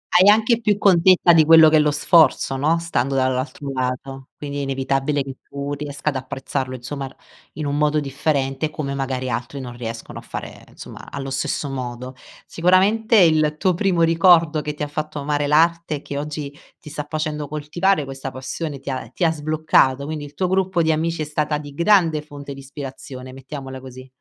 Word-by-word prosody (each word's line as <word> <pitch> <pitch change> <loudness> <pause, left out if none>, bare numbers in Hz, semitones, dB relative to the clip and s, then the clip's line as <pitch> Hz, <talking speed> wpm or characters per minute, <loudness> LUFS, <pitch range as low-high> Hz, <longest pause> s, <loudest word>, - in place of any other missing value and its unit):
Hai 185 +3 +7
anche 225 +2 +4
più 210 -2 +2
contezza 180 -3 +5
di 160 -1 +6
quello 160 0 +8
che 155 - +4
è - - +5
lo 150 0 +3
sforzo, 145 -2 +3
no, 155 +5 +2
stando 140 -5 -1
dall'altro 130 +2 -1
lato, 130 +1 -4
quindi 145 -1 -5
è - - -2
inevitabile 135 +1 -1
che 135 -1 -8
tu 140 +1 -4
riesca 145 +1 -3
ad 140 - -2
apprezzarlo, 130 0 -4
insomma, 135 +2 -6
r - - -15 0.4
in 150 0 -5
un 145 0 -1
modo 150 0 +2
differente, 140 0 -1
come 140 -3 -4
magari, 130 -2 -3
altri 125 +3 -4
non 120 -2 -7
riescono 115 -1 -7
a - - -11
fare, - - -8
insomma, - - -11
allo 135 -1 -6
stesso 135 +2 -2
modo. 125 -1 -5 0.3
Sicuramente, 200 +6 +2
il 155 -4 +4
tuo 185 0 +2
primo 180 -2 +1
ricordo, 165 -2 +4
che 150 0 -5
ti 150 - -4
ha - - -2
fatto 155 +1 -5
amare 145 0 -1
l'arte, 165 +1 +2
e 140 - -7
che 140 0 -4
oggi 145 -1 -5 0.2
ti 150 - -12
sta 150 -1 -5
facendo 155 -2 -3
coltivare 155 +3 0
questa 135 0 -6
passione, 135 +3 -5
ti 135 0 -5
ha 130 -4 -5
ti 175 - -4
ha 165 - +4
sbloccato, 150 -3 +1
quindi 150 -1 -5
il 145 0 -13
tuo 185 - 0
gruppo 190 -2 +1
di 160 - +2
amici 160 0 -1
è - - -4
stata 150 0 -1
di 145 -1 -9
grande 170 -2 +3
fonte 145 -2 -9
di 135 - -11
ispirazione, 135 -2 -9
mettiamola 135 -1 -8
così. 130 0 -11
145 Hz, 195 wpm, -21 LUFS, 135-160 Hz, 0.4 s, quello